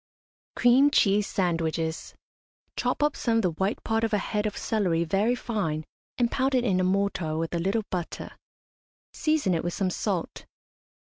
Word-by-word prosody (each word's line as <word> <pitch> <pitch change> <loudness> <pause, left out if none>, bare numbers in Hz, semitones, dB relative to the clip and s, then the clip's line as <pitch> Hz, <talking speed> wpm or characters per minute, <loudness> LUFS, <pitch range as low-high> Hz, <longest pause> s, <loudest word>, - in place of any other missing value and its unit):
CREAM 255 +4 +5
CHEESE 205 -6 +3
SANDWICHES. 165 -2 -1 0.6
Chop 250 +4 0
up 295 0 +2
some 230 -2 0
of - - +3
the 180 - +2
white 190 +7 -2
part 225 0 0
of 225 -1 0
a - - +4
head 210 +1 -1
of 210 - -5
celery 185 -7 0
very 200 +8 +1
fine, 185 -11 -2 0.3
and 240 -1 +1
pound 265 0 +1
it 250 - +2
in 195 -6 +2
a - - +2
mortar 185 -4 0
with 165 +1 -2
a 170 - 0
little 195 +6 0
butter; 175 -3 -4 0.8
season 310 - +1
it 165 - -1
with 175 - -2
some 190 -2 0
salt. 185 -2 -3
200 Hz, 175 wpm, -27 LUFS, 170-230 Hz, 0.8 s, CREAM